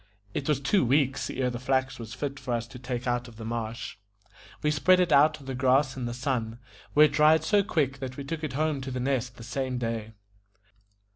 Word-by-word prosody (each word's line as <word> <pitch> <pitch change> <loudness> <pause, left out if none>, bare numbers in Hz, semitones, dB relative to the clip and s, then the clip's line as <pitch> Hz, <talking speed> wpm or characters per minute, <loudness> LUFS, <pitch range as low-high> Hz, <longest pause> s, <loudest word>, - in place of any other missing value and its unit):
It 140 - -3
was 150 -3 +2
two 165 +7 +2
weeks 135 +1 +1
ere 125 -1 -1
the 120 - -5
flax 130 0 0
was 115 +1 -7
fit 140 +1 -4
for 120 - -2
us 115 0 -2
to 125 - -10
take 125 -1 -4
out 120 0 -1
of 120 - -13
the 110 0 -8
marsh. 115 +1 -4 0.7
We 150 - +3
spread 180 +5 +4
it 180 -2 +2
out 150 +2 +5
on 140 - -14
the 135 - -4
grass 130 +1 +2
in 130 -2 -4
the 120 - -3
sun, 125 -4 -2 0.4
where 150 +1 +8
it 150 - +1
dried 155 +2 +5
so 205 -1 +3
quick 145 -9 0
that 130 -1 -6
we 140 - -5
took 160 +3 -5
it 150 -4 -3
home 150 0 0
to 130 - -5
The 130 -1 -3
Nest 125 -1 -1
the 115 - -10
same 130 +1 -3
day. 115 -2 -3
130 Hz, 230 wpm, -28 LUFS, 120-145 Hz, 0.7 s, where